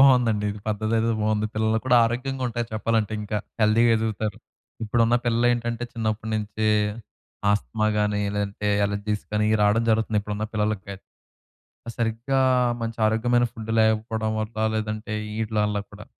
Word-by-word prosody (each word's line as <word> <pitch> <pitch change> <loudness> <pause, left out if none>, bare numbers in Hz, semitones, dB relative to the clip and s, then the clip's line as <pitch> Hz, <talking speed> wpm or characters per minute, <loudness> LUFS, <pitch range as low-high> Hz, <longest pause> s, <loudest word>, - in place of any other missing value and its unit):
బావుందండి. 125 -6 +5
ఇది 100 0 -7
పద్ధతేదో 110 +2 0
బాగుంది. 110 0 +1
పిల్లలు 110 +1 +1
కూడా 125 -1 +4
ఆరోగ్యంగా 130 +3 -2
ఉంటారు 120 0 -3
చెప్పాలంటే, 110 -1 0
ఇంకా 105 0 -2 0.2
హెల్దీగా 115 +2 +4
ఎదుగుతారు. 110 -1 -2 0.5
ఇప్పుడున్న 115 +2 +3
పిల్లలేంటంటే, 120 0 +1
చిన్నప్పుడి 110 -1 -2
నుంచి 110 0 -1 0.8
ఆస్తమా 110 +1 0
గాని 105 0 +1 0.2
లేదంటే, 105 0 -2 0.2
అలెర్జీస్ 105 +1 -3
గాని 105 0 +2
ఇయి 110 - +3
రావడం 110 +3 +3
జరుగుతుంది. 110 -1 +1
ఇప్పుడున్న 105 +1 -3
పిల్లలకయిత్ 105 -2 -2 0.9
సరిగ్గా 115 +4 0 0.4
మంచి 115 0 -4
ఆరోగ్యమైన 120 +2 +2
ఫుడ్డు 110 0 -5
లేకపోడం 110 0 +1
వల్ల, 110 +1 -5 0.2
లేదంటే 110 0 -3 0.3
ఈటిల 110 0 -2
వల్ల 105 0 -1
కూడా. 105 0 -12
110 Hz, 135 wpm, -24 LUFS, 105-115 Hz, 0.9 s, బావుందండి